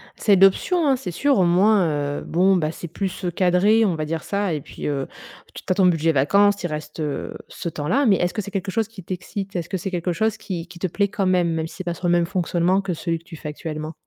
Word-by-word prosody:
C'est 205 - +3
l'option, 195 - +4
hein, 270 - +4
c'est 230 -8 -5
sûr 280 - +2
au 190 - +4
moins, 190 +3 +4 0.3
heu, - - -9
bon, 185 +3 +3
bah, 155 -4 0
c'est 170 - -8
plus, 190 +3 -4
heu, 175 - 0
cadré. 185 +5 +3
On 185 -5 +1
va 155 -1 -3
dire 160 0 -3
ça, 200 -3 -1
et 150 - -3
puis, - - -7
heu, 140 -2 -2 0.5
tu - - -9
tu - - -2
as - - +3
ton 190 -1 +4
budget 165 -2 +2
vacances, 200 +9 +4
tu 190 - -6
y - - -11
reste, 150 +1 -6
heu, 150 -2 -3
ce 170 - -5
temps-là, 165 - 0
mais 210 -5 +5
est-ce 175 0 0
que 215 - -2
c'est 200 - -8
quelque 195 -1 -3
chose 225 +1 0
qui 215 -4 -12
t'excite? 195 +2 -6
Est-ce 170 -2 -3
que 190 - -1
c'est 190 +2 -5
quelque 180 0 -1
chose 220 +3 0
qui 175 -3 -5
qui 175 0 -13
te 185 - 0
plaît 200 +4 0
quand 205 -2 -1
même 180 -2 +2
même 160 0 -2
si - - -13
c'est 185 - -5
pas 175 -1 -2
sur 175 +1 -4
le - - +3
même 175 -1 +3
fonctionnement 180 +1 +1
que 195 -2 -3
celui 165 0 -2
que - - -25
tu 170 - -11
fais 150 - -7
actuellement? 155 +1 -6
180 Hz, 280 wpm, -22 LUFS, 165-200 Hz, 0.5 s, mais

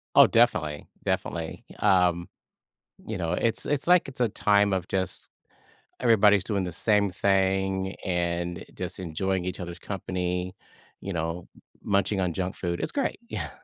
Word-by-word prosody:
Oh, - - +10
definitely, 75 -1 +2 0.2
definitely. 80 -2 -3
Y - - -13 0.3
um, 85 0 -2 0.8
you 110 -3 -3
know, 85 -1 -1
it's 115 +5 0
it's 145 +1 -1
like 180 0 +5
it's 130 -2 -7
a 120 - +3
time 100 -1 +3
of 95 -1 -1
just 95 -1 -2 0.7
everybody's 105 -5 +5
doing 100 -3 -1
the 90 - -4
same 105 +2 +2
thing 95 0 +1
and 85 -1 -1
just - - -5
enjoying 95 +2 -2
each 90 0 -4
other's 85 0 -6
company, 90 -2 -3 0.5
you 100 - -5
know, 85 +1 -3 0.4
munching 100 0 +1
on 90 -2 0
junk 90 +2 -3
food. 85 -1 -3
It's - - -2
great. 280 - -1
Yeah. - - -4
95 Hz, 155 wpm, -27 LUFS, 90-100 Hz, 0.8 s, Oh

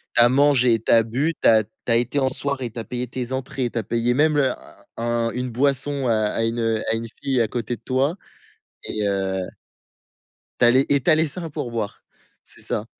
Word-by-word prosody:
Tu 120 - +6
as 120 - +7
mangé, 130 -3 +4
tu - - 0
as 115 - +7
bu, 135 +9 -1
tu - - +4
as 110 -2 +5
tu - - -30 0.2
as - - +5
été 120 +4 0
en 130 -1 +2
soirée, 130 -2 -3
tu 115 - -10
as 115 - -4
payé 125 +1 -4
tes 125 0 -5
entrées, 130 -1 -3
tu 115 - -3
as - - -1
payé 115 +3 0
même 155 +2 +3
le 135 -3 +3 0.5
un 115 0 0
une 125 +1 -3
boisson 140 +2 0
à 110 0 +1
une 115 +1 -1 0.3
à 115 - +1
une 115 +1 -3 0.2
fille 135 -3 +1
à 115 - +2
côté 120 +1 -3
de - - -26
toi, 135 +7 0 0.7
et 105 -1 -2
heu 95 -1 -1 1.2
Tu - - +5
allais 130 +3 +4
et 140 -1 +3
tu 170 - +2
as - - +7
laissé 160 +3 -1
un 165 - -6
pourboire, 115 -7 -4 0.4
c'est - - -19
ça. 105 - -3
125 Hz, 215 wpm, -22 LUFS, 115-135 Hz, 1.2 s, as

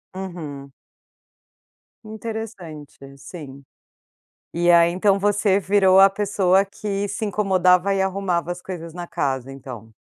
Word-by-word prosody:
Uhum. 155 -7 -7 1.3
Interessante. 215 -9 -8 0.2
Sim, 140 -3 -10 0.9
e 175 +1 +2
aí 170 0 +6
,então, 195 +3 +2
você 205 0 +2
virou 190 -1 +4
a 195 - +8
pessoa 195 -1 +1
que 200 0 -4
se 205 +2 -4
incomodava 190 -2 +2
e 195 - 0
arrumava 190 -3 -1
as 175 0 -6
coisas 170 -3 -8
na 175 -1 -6
casa, 135 -6 -3
então. 125 -5 -10
185 Hz, 120 wpm, -22 LUFS, 165-200 Hz, 1.3 s, a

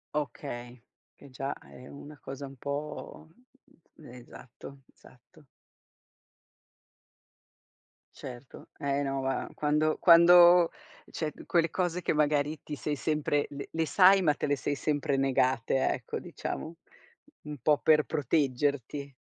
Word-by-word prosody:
Okay, 120 -3 -5 0.4
che 140 - -16
già 135 +2 -4
è 125 +1 -15
una 145 +1 -12
cosa 140 +1 -7
un 135 - -11
po' 150 +3 -6 0.7
esatto 125 0 -13
esatto. 135 +5 -21 2.7
Certo. 125 +1 -11
Eh 140 -1 -1
no 135 -1 -2
ma, 135 0 -2
quando 150 +1 +1
quando 175 0 +7 0.4
cioè, 155 -3 -4
quelle 165 -2 +1
cose 180 -1 -2
che, - - 0
magari, 150 0 0
ti 150 - -7
sei 150 +1 -3
sempre 150 -1 -1
le 140 0 -8
le 160 0 -1
sai 195 0 +6
ma 150 -4 +2
te - - -3
le 145 - +1
sei 145 +1 -3
sempre 145 -1 -1
negate, 130 -1 +1
ecco, - - -4
diciamo, 165 +2 -6 0.7
un 150 -1 -7
po' 150 +4 +2
per 155 -1 +4
proteggerti. 140 -1 -1
145 Hz, 120 wpm, -29 LUFS, 135-155 Hz, 2.7 s, quando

